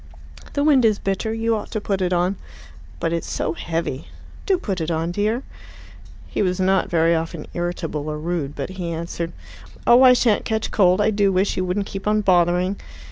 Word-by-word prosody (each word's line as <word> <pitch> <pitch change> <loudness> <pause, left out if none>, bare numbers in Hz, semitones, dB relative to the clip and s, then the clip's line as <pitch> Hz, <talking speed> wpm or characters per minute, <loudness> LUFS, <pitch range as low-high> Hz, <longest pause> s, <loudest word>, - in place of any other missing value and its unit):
"The 285 - 0
wind 285 -4 +5
is 215 -2 +4
bitter. 195 +3 -2
You 225 0 0
ought 210 - -5
to 215 - -2
put 195 -2 -2
it 180 -1 0
on." 180 +2 +1 0.6
"But 165 0 -1
it's 170 - -3
so 160 - -1
heavy." 165 -4 -3 0.4
"Do 385 -2 +3
put 195 - -3
it 160 - -2
on, 165 +1 -1
dear." 215 +7 -1 0.8
He - - -3
was 185 -1 0
not 190 0 +2
very 165 0 +3
often 165 -1 -3
irritable 165 -3 -3
or 150 - -3
rude, 155 -3 -3
but - - -4
he 185 -2 -5
answered, 170 0 -4 0.5
"Oh, 240 +2 +7
I 255 -1 +8
shan't 235 -4 +2
catch 220 0 -2
cold. 185 -1 +4
I 215 +1 +3
do 200 -2 +2
wish 190 +2 +1
you 185 - -1
wouldn't 190 +3 -1
keep 195 +1 -6
on 215 0 +3
bothering." 180 0 +2
185 Hz, 195 wpm, -22 LUFS, 170-210 Hz, 0.8 s, I